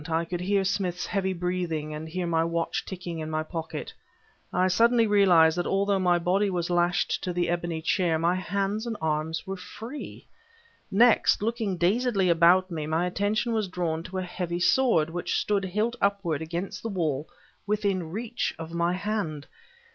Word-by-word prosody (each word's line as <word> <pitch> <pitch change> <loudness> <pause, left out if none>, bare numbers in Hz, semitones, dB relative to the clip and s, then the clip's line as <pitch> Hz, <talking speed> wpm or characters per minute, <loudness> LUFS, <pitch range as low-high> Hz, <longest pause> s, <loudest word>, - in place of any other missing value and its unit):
I 165 +1 0
could 175 +1 -4
hear 195 +1 +1
Smith's 185 -2 -1
heavy 190 -2 -1
breathing 175 -4 -2
and 155 +1 -6
hear 180 +2 -3
my 165 -1 +1
watch 170 0 -1
ticking 175 -3 -6
in 155 0 -4
my 155 0 -1
pocket. 160 0 -6 0.6
I 180 +1 +2
suddenly 230 +5 +4
realized 180 -6 +5
that 175 - -1
although 200 0 +1
my 180 -1 +3
body 190 +4 +1
was 175 -2 -2
lashed 175 0 +1
to 180 - -1
the 175 -1 0
ebony 170 -2 -2
chair, 170 -2 +2
my 170 +2 +2
hands 200 +4 -2
and 225 -2 -3
arms 160 +1 -2
were 195 - -4
free. 230 +9 -8 0.6
Next, 225 0 +4
looking 220 -4 -1
dazedly 195 +1 +2
about 175 +3 +5
me, 155 -3 -3
my 160 +3 +1
attention 205 +6 0
was 215 -3 0
drawn 170 -3 -2
to 185 +3 -7
a 185 - -1
heavy 175 -1 -3
sword 180 -6 +3
which 175 +1 -2
stood 200 -2 0
hilt 215 +6 -1
upward 195 -7 0
against 170 +4 -4
the 225 - -4
wall 160 -7 -2 0.4
within 200 -5 0
reach 230 +6 -3
of 165 0 -7
my 170 +1 +1
hand. 185 -7 -3
180 Hz, 175 wpm, -27 LUFS, 165-200 Hz, 0.6 s, realized